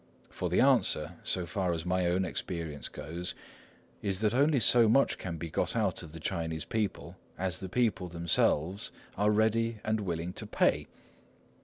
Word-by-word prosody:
For -, -, -3 dB
the -, -, +3 dB
answer, 75 Hz, +3 st, +3 dB
so 90 Hz, -2 st, 0 dB
far 90 Hz, +1 st, -1 dB
as 80 Hz, 0 st, -4 dB
my 90 Hz, 0 st, +1 dB
own 90 Hz, +2 st, +1 dB
experience 80 Hz, -4 st, -3 dB
goes, 85 Hz, +4 st, -5 dB, 0.7 s
is 95 Hz, -2 st, -1 dB
that 110 Hz, 0 st, +2 dB
only 140 Hz, +2 st, +3 dB
so 115 Hz, +1 st, +5 dB
much 135 Hz, +5 st, +3 dB
can 85 Hz, -3 st, -5 dB
be 80 Hz, 0 st, -6 dB
got -, -, -1 dB
out -, -, 0 dB
of 80 Hz, -3 st, -10 dB
the 80 Hz, -, -9 dB
Chinese 80 Hz, -2 st, -3 dB
people 110 Hz, -3 st, -3 dB, 0.2 s
as 90 Hz, -3 st, -1 dB
the 95 Hz, -, -6 dB
people 110 Hz, -4 st, +1 dB
themselves 85 Hz, +1 st, +1 dB, 0.2 s
are 105 Hz, +2 st, +2 dB
ready 110 Hz, +2 st, +2 dB
and 110 Hz, 0 st, 0 dB
willing 85 Hz, -3 st, -3 dB
to -, -, -7 dB
pay. -, -, +1 dB
90 Hz, 170 wpm, -30 LUFS, 85-105 Hz, 0.7 s, so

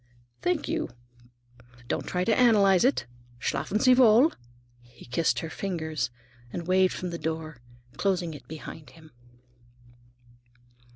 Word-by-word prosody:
"Thank 355 Hz, -4 st, 0 dB
you. -, -, -2 dB, 1.0 s
Don't -, -, -2 dB
try 180 Hz, 0 st, -1 dB
to 220 Hz, +3 st, +2 dB
analyze 205 Hz, -7 st, +5 dB
it. 125 Hz, -3 st, +2 dB, 0.3 s
Schlafen 145 Hz, -, -1 dB
sie 255 Hz, +2 st, +6 dB
wohl!" 250 Hz, +3 st, +6 dB, 0.5 s
he 120 Hz, 0 st, -17 dB
kissed 130 Hz, +7 st, 0 dB
her 165 Hz, -, -5 dB
fingers 160 Hz, -7 st, -3 dB, 0.4 s
and 170 Hz, -, -5 dB
waved 185 Hz, +1 st, +3 dB
from 180 Hz, -1 st, -4 dB
the 170 Hz, -, -5 dB
door, 160 Hz, -2 st, -4 dB, 0.4 s
closing 180 Hz, -4 st, 0 dB
it 145 Hz, -, -12 dB
behind 155 Hz, -2 st, -9 dB
him. 155 Hz, +3 st, -17 dB
170 Hz, 125 wpm, -27 LUFS, 155-200 Hz, 1.0 s, sie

